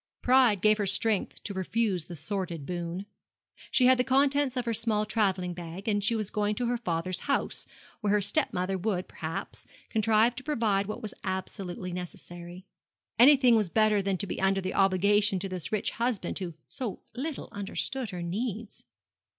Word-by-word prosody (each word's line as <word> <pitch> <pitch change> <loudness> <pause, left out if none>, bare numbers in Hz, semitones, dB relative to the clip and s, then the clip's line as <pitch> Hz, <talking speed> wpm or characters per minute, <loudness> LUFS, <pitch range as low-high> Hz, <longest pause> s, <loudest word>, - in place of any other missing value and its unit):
Pride 250 -6 +5
gave 215 0 +4
her 205 - 0
strength 210 +1 +2
to 200 - -4
refuse 190 -2 -1
the 175 - -8
sordid 170 -1 -4
boon. 175 +2 -4 0.6
She 255 - +4
had 255 0 +6
the - - +4
contents 275 0 +2
of 245 - -1
her 230 - 0
small 220 -1 +2
travelling 190 -5 0
bag, 175 +4 -8
and 205 -2 +1
she 230 - +2
was 215 -3 -2
going 210 0 0
to 245 - -1
her 240 +1 0
father's 180 -4 -2
house, 280 - -1 0.3
where 205 -1 +1
her 210 - +4
step 305 +9 +3
mother 185 +1 -1
would, 185 -2 -1
perhaps, 160 0 -6 0.3
contrive 220 +2 +3
to 260 - -6
provide 220 -9 +1
what 215 - -6
was 215 - -5
absolutely 185 -1 -4
necessary. 175 0 -8 0.5
Anything 255 -1 +7
was 210 -5 +2
better 215 +1 +3
than 195 -1 -1
to 200 - -2
be 190 - -4
under 195 0 +2
an 185 - -3
obligation 200 +1 +3
to 190 +2 -2
this 185 -3 -4
rich 215 -2 0
husband 235 -4 -2
who 175 -4 -5
so 240 -7 -5
little 275 +5 -4
understood 215 +5 -3
her 175 -2 -5
needs. 215 +4 -4
205 Hz, 180 wpm, -28 LUFS, 185-230 Hz, 0.6 s, Anything